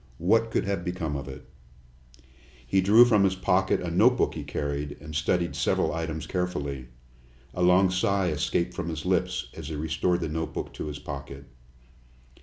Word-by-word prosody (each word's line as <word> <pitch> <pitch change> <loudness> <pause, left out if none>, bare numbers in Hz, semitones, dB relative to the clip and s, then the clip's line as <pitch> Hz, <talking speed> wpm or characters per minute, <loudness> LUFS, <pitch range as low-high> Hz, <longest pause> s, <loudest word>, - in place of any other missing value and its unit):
"What 115 +7 +2
could 110 - 0
have 100 -3 -2
become 85 -4 -3
of 70 0 -5
it?" 65 - -10 1.2
He 95 +10 +2
drew 105 +6 +7
from 105 -4 +4
his 95 -1 +2
pocket 95 +1 +1
a 90 -2 -3
notebook 115 +9 +3
he - - -5
carried, 70 0 -4
and 75 +1 -10
studied 85 +3 0
several - - +1
items 80 -1 -3
carefully. 70 -8 -3 0.7
A 90 - -4
long 90 +1 +5
sigh 95 0 +1
escaped 85 +3 -1
from 85 - -4
his 80 0 -5
lips 90 0 0
as 80 -3 -7
he 80 - -4
restored 80 +3 0
the 80 - -1
notebook 80 +1 -4
to - - -5
his 75 -1 -5
pocket. 70 -1 -8
85 Hz, 170 wpm, -27 LUFS, 75-95 Hz, 1.2 s, drew